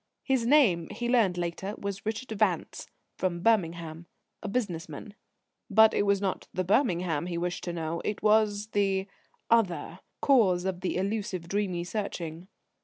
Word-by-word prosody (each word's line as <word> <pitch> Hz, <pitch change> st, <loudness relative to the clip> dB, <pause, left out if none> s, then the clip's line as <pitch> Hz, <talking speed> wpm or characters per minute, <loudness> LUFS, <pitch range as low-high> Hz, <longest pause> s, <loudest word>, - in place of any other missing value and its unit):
His 260 Hz, -4 st, +1 dB
name, 230 Hz, -, +4 dB
he 235 Hz, +3 st, -4 dB
learned 225 Hz, -8 st, +3 dB
later, 175 Hz, +4 st, -3 dB
was 200 Hz, +1 st, -5 dB
Richard 225 Hz, +3 st, -3 dB
Vance; -, -, 0 dB, 0.3 s
from 175 Hz, -2 st, -1 dB
Birmingham; 170 Hz, -6 st, 0 dB, 0.3 s
a -, -, -5 dB
business 195 Hz, -6 st, -2 dB
man. 210 Hz, -, -9 dB, 0.6 s
But 220 Hz, +2 st, +6 dB
it 205 Hz, -, +1 dB
was 200 Hz, -1 st, +3 dB
not 195 Hz, -1 st, -2 dB
the 185 Hz, -, -1 dB
Birmingham 180 Hz, -, +1 dB
he 175 Hz, -1 st, -3 dB
wished 175 Hz, +1 st, -3 dB
to 175 Hz, -, -2 dB
know; 165 Hz, 0 st, -3 dB
it 210 Hz, -, -3 dB
was 215 Hz, -1 st, +3 dB
the 195 Hz, -1 st, +1 dB, 0.5 s
other: 185 Hz, -6 st, +1 dB, 0.2 s
cause 195 Hz, -10 st, +3 dB
of 185 Hz, -2 st, -2 dB
the 185 Hz, -, -1 dB
elusive, 195 Hz, -3 st, -2 dB
dreamy 185 Hz, -2 st, -1 dB
searching. 175 Hz, -3 st, -5 dB
190 Hz, 155 wpm, -28 LUFS, 175-215 Hz, 0.6 s, But